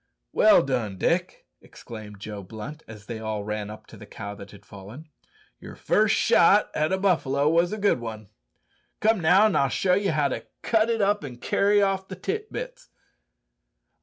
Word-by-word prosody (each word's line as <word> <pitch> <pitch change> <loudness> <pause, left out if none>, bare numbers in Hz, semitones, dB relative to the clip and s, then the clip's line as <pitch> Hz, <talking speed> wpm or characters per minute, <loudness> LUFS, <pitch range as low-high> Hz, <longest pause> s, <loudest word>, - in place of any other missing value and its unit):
"Well - - +5
done, 120 -7 -2
Dick," - - -1 0.2
exclaimed 105 -3 -11
Joe 105 0 -7
Blunt, 110 +10 -9
as 105 -2 -12
they 115 -1 -6
all 110 -2 -4
ran 105 0 -4
up 105 - -10
to - - -14
the - - -12
cow 100 0 -7
that 100 0 -11
had 100 -1 -16
fallen. 100 - -12 0.5
"Your - - -11
first - - +2
shot - - +4
at 155 - +1
the 190 - 0
buffalo 150 -7 +1
was 170 +2 +2
a 215 - -3
good 200 - +1
un. 110 -2 -7 0.7
Come, 220 0 +2
now, 180 +6 +5
an' 215 - +2
I'll 135 - +2
show 180 +8 +1
ye 200 +2 +1
how 150 -5 +1
to - - -5 0.2
cut 225 0 +2
it 225 -2 0
up 205 -2 +1
an' 130 -4 -8
carry 205 +9 +2
off 190 -1 -1
the 190 - -7
tit 425 - -4
bits." - - -7
145 Hz, 190 wpm, -25 LUFS, -, 0.7 s, Well